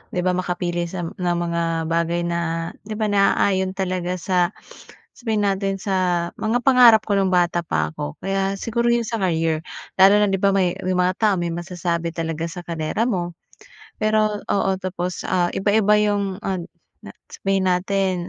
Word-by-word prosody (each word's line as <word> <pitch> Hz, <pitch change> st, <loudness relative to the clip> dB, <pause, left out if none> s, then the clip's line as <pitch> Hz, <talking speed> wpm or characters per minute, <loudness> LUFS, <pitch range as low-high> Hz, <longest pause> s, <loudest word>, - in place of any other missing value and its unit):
'di 180 Hz, -, 0 dB
ba. 185 Hz, -, +2 dB
Makapili 175 Hz, -1 st, -2 dB
sa, 175 Hz, 0 st, -5 dB
ng 175 Hz, +1 st, -2 dB
mga 165 Hz, -1 st, -1 dB
bagay 170 Hz, +1 st, 0 dB
na, 170 Hz, -1 st, -2 dB, 0.2 s
'di 215 Hz, -, -4 dB
ba, 215 Hz, 0 st, -1 dB
naaayon 195 Hz, -1 st, +2 dB
talaga 185 Hz, -2 st, -2 dB
sa, 180 Hz, +1 st, 0 dB, 0.6 s
sabihin 220 Hz, -4 st, -1 dB
natin 195 Hz, 0 st, -1 dB
sa 195 Hz, -1 st, -2 dB, 0.4 s
mga 225 Hz, +3 st, +1 dB
pangarap 240 Hz, -4 st, +7 dB
ko 205 Hz, -, 0 dB
nung 190 Hz, -1 st, +1 dB
bata 175 Hz, -1 st, +2 dB
pa 80 Hz, -, -1 dB
ako. 75 Hz, -1 st, -6 dB
Kaya 195 Hz, 0 st, 0 dB
siguro 235 Hz, +1 st, -1 dB
yung 235 Hz, -1 st, +1 dB
sa 230 Hz, 0 st, -2 dB
career, 165 Hz, -4 st, 0 dB, 0.4 s
lalo 195 Hz, +2 st, +8 dB
na -, -, +3 dB
'di 195 Hz, -, 0 dB
ba, 200 Hz, 0 st, +3 dB
may 180 Hz, -2 st, +2 dB
may 185 Hz, 0 st, 0 dB
mga 180 Hz, 0 st, +2 dB
tao 215 Hz, -2 st, +3 dB
may 170 Hz, -1 st, -2 dB
masasabi 170 Hz, -1 st, -3 dB
talaga 165 Hz, -1 st, -3 dB
sa 175 Hz, -1 st, -8 dB
karera 165 Hz, +5 st, -2 dB
mo. 175 Hz, -6 st, -2 dB, 0.6 s
Pero, 215 Hz, -1 st, +1 dB
oo, 195 Hz, -1 st, +1 dB
tapos, 180 Hz, -1 st, -4 dB
ah, 175 Hz, -1 st, +1 dB
iba-iba 210 Hz, +1 st, +3 dB
'yung, 205 Hz, -2 st, 0 dB
ah, 190 Hz, -2 st, -1 dB, 0.7 s
sabihin 195 Hz, -1 st, 0 dB
natin 185 Hz, +1 st, +1 dB
185 Hz, 165 wpm, -22 LUFS, 175-200 Hz, 0.7 s, lalo